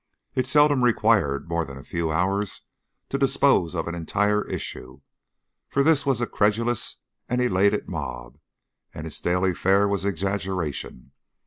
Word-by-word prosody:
It 130 -1 0
seldom 145 -1 +4
required 110 - +2
more 85 0 0
than 70 -3 -9
a 65 - -11
few 85 +5 -2
hours 95 +5 -1 0.5
to 135 - -2
dispose 135 - +2
of 80 -1 -2
an 85 - -3
entire 105 +5 0
issue, 65 +2 -6 0.7
for 140 - +1
this 150 -2 +3
was 135 -4 +2
a - - +2
credulous 115 +2 0 0.3
and 125 - 0
an 125 - +2
elated 100 -1 +2
mob, 65 -8 -6 0.6
and 75 - -6
its 80 - -7
daily 90 +1 +1
fare 100 +3 +3
was 100 -1 -1
exaggeration. 95 -9 -3
100 Hz, 150 wpm, -24 LUFS, 85-120 Hz, 0.7 s, seldom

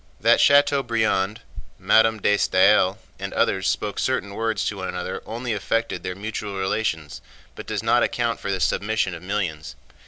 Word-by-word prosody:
That - - +4
Chateaubriand, 115 -8 +2 0.4
Madame 110 0 +3
de 105 +1 +3
Staël, 95 0 +3 0.2
and - - -5
others 95 0 +1
spoke 105 -2 -2
certain 100 -6 -1
words 115 +1 -1
to 105 - -2
one 95 -1 -4
another 90 +1 -4
only 120 +1 -3
affected 110 -2 -2
their 90 0 -5
mutual 105 0 -5
relations 95 -6 -2 0.3
but - - -10
does - - -3
not - - +3
account 115 -2 -1
for - - -5
the 95 - -1
submission 105 0 0
of 85 - -8
millions. 90 -6 -3
105 Hz, 160 wpm, -23 LUFS, 95-110 Hz, 0.4 s, That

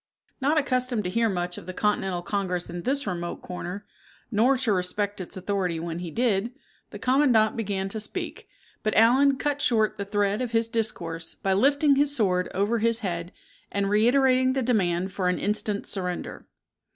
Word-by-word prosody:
Not 290 +4 +2
accustomed 255 -5 +1
to 180 - -3
hear 230 +2 +2
much 175 -2 -3
of - - -14
the 185 - -6
Continental 190 -4 0
Congress 180 -3 -2
in 175 0 -5
this 275 +7 0
remote 175 -3 -4
corner, 180 +3 -6 0.5
nor 240 +5 +3
to 245 -4 +1
respect 200 +2 -1
its 185 - -7
authority 185 -3 -1
when 165 0 -4
he 175 -1 -5
did, 225 +2 0 0.4
the - - -8
commandant 255 -5 +3
began 200 -3 -2
to 220 - -3
speak; 210 - -5 0.3
but 215 - -1
Allen 265 +5 +5
cat 290 0 -1
shore 220 -5 +2
the 200 - -4
thread 205 +1 0
of 245 -2 -3
his 225 0 +3
discourse 170 -8 -2
by 195 - 0
lifting 280 +6 +3
his 285 0 +2
sword 180 -7 +1
over 205 +4 0
his 230 +1 +1
head, 175 -3 -3 0.4
and 200 0 -1
reiterating 255 +4 +4
the 265 -1 0
demand 190 -6 +1
for 185 -2 0
an 180 - 0
instant 210 0 0
surrender. 180 -3 -4
210 Hz, 175 wpm, -26 LUFS, 185-245 Hz, 0.5 s, Allen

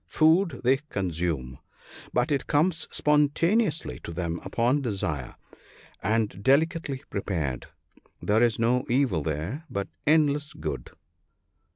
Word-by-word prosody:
Food 160 -2 +3
they 130 +2 +4
consume, 85 - -3 0.5
but 125 +5 +1
it 140 -2 0
comes 155 +2 +2
spontaneously 150 - +2
to - - -8
them 85 0 -3
upon 125 +5 +1
desire, 85 - -3 0.7
and 105 -1 0
delicately 145 - +1
prepared. 80 -11 -2 0.5
There 105 +2 +2
is 120 -2 +3
no 125 +2 +2
evil 125 - +2
there, 80 - -3
but 100 0 -3 0.2
endless 150 -1 +3
good. - - -5
125 Hz, 110 wpm, -27 LUFS, 90-150 Hz, 0.7 s, they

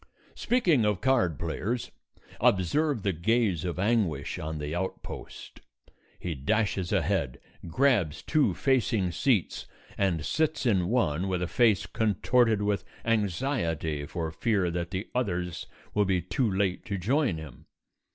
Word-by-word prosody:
Speaking 180 - +2
of 105 -3 +1
card 120 - +2
players, 100 +8 -3 0.5
observe 115 - +2
the 100 - +1
gaze 95 0 +1
of 90 -1 -3
anguish 95 -8 0
on 80 0 -4
the 75 +1 -4
outpost. 95 +2 -6 0.6
He 90 - -4
dashes 95 +5 0
ahead, 60 - 0 0.3
grabs 100 - +1
two 155 -2 +2
facing 115 -8 +1
seats 100 - 0 0.3
and 85 -6 +1
sits 155 -2 0
in 95 -7 +2
one 95 -7 +1
with 90 -2 -1
a - - -1
face 110 -1 +3
contorted 110 0 +2
with 105 -1 0 0.2
anxiety 95 - -1
for 80 -3 -3
fear 90 +2 0
that 85 0 -3
the 95 +2 -4
others 90 -8 -2 0.3
will 105 -1 +2
be 95 -1 +1
too 110 +7 -1
late 95 -1 0
to 100 -3 -3
join 120 - +1
him. 75 -2 -11
95 Hz, 135 wpm, -28 LUFS, 85-115 Hz, 0.6 s, face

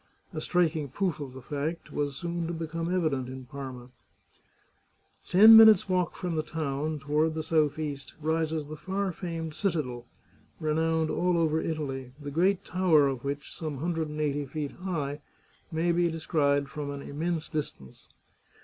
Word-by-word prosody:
A 155 - -4
striking 165 -4 +1
proof 175 +3 -1
of 140 -3 -6
the 130 -1 -10
fact 150 +5 -4
was 145 -1 -1
soon 170 +2 -3
to 170 - -3
become 165 +1 -3
evident 155 -8 0
in 130 0 -8
Parma. 130 -2 -8 1.4
Ten 215 +5 +9
minutes' 220 -4 +9
walk 180 -2 0
from 175 -3 -3
the 155 - +1
town, 155 -1 -3
toward 150 +3 0
the 160 - -2
southeast, 150 -2 -1
rises 160 0 0
the 155 +2 -7
far 190 +4 -2
famed 165 -2 -5
citadel, 150 -10 -2 0.5
renowned 160 +1 +1
all 180 -1 +1
over 160 -1 +2
Italy, 135 -5 -4
the 145 -1 -6
great 180 +5 +2
tower 175 -6 +4
of 130 -3 -3
which, 140 +1 -4
some 155 -4 -4
hundred 165 +1 -2
and 150 0 -6
eighty 145 -1 -1
feet 145 0 -4
high, 150 -6 -4 0.5
may 165 +2 +1
be 170 0 +2
descried 145 -3 +1
from 145 0 -5
an 140 0 -5
immense 160 +2 -2
distance. 105 - -6
155 Hz, 160 wpm, -28 LUFS, 145-170 Hz, 1.4 s, Ten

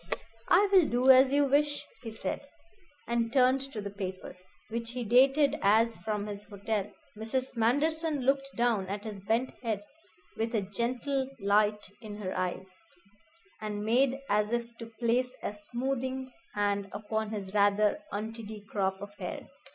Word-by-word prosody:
"I 390 +4 +6
will 370 -6 +6
do 250 +2 +5
as 260 +1 +7
you 285 0 +4
wish," 290 +1 +1 0.2
he 235 - -6
said, 220 -4 -4 0.7
and 235 -1 0
turned 265 +1 +3
to 215 - -5
the 200 0 -5
paper, 190 -2 -6 0.3
which 230 +1 -4
he 250 -1 -3
dated 270 +5 +5
as 220 +3 +3
from 210 -1 -2
his 205 -1 -6
hotel. 205 0 -3 0.3
Mrs. 250 +5 -2
Manderson 295 +6 +1
looked 275 +1 +1
down 230 -5 +1
at 200 +2 -4
his 210 -3 -6
bent 225 +6 0
head 220 -4 -2 0.5
with 225 +1 -1
a 215 - +2
gentle 250 +6 -2
light 205 0 +2
in 215 -2 -7
her 195 -3 -4
eyes, 185 +1 -3 0.9
and 210 -1 -3
made 255 +4 +3
as 210 +1 +1
if 235 0 -2
to 230 - -7
place 240 +3 0
a - - -2
smoothing 260 +4 -3 0.2
hand 200 -1 0
upon 215 +1 -2
his 200 -3 -5
rather 205 +4 +3
untidy 215 0 -6
crop 190 -2 0
of 200 0 -9
hair. - - -5
225 Hz, 155 wpm, -30 LUFS, 205-260 Hz, 0.9 s, as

